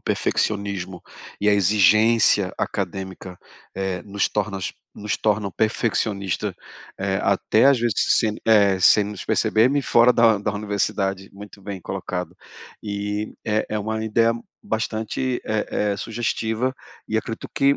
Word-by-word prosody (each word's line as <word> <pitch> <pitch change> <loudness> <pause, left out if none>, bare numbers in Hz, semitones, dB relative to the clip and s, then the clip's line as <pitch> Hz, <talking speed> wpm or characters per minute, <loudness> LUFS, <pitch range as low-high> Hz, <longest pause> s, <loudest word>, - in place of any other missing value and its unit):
perfeccionismo 100 -4 -2 0.4
e 105 - +2
a - - +5
exigência 105 +1 +4
acadêmica, 95 -1 -4 0.4
eh, 95 -1 -3
nos 100 0 -1
tornas 100 -2 -3 0.2
nos 105 0 -3
tornam 105 -2 0
perfeccionista, 105 -3 -1 0.5
eh, 95 0 -1
até 100 +4 +3
às 140 -2 +5
vezes 115 -3 0 0.2
sem, 110 -2 0
eh, 100 -4 +4
sem 105 +3 +6
nos 105 -1 -7
perceber-me, 125 +6 +2
fora 120 -1 +4
da 115 -3 +4
da 105 +1 -2
universidade, 100 -2 -2
muito 100 0 -12
bem 100 -1 -6
colocado. 90 -1 -5 0.5
E 105 0 -3
é 110 0 0
é 110 - -1
uma 110 +1 -3
ideia 115 +1 +2 0.3
bastante, 110 +3 -2
eh 110 -1 -1 0.3
eh, 100 - -3
sugestiva, 115 +2 -2 0.3
e 110 - -1
acredito 115 0 -4
que 140 +1 +3
105 Hz, 130 wpm, -22 LUFS, 100-110 Hz, 0.5 s, sem